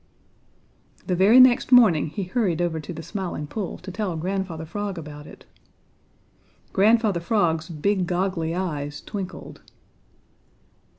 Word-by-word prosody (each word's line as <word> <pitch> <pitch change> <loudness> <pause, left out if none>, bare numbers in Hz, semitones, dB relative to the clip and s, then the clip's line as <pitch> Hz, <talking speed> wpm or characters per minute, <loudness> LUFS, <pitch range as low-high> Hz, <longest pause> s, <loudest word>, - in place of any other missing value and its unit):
The 180 - 0
very 200 +8 +6
next 255 0 +5
morning 220 -12 +6
he 190 +6 -4
hurried 185 -3 -1
over 170 -2 -1
to 155 - -8
the 165 -1 -7
Smiling 185 -7 -5
Pool 190 +5 -5
to 190 - -9
tell 195 -3 -3
Grandfather 180 -2 -3
Frog 200 +2 -5
about 150 -2 -9
it. - - -14 1.3
Grandfather 215 -2 +3
Frog's 170 -3 0
big, 180 +3 -1
goggly 175 -2 -1
eyes 145 -6 -3
twinkled. 195 -3 -7
180 Hz, 125 wpm, -24 LUFS, 160-205 Hz, 1.3 s, very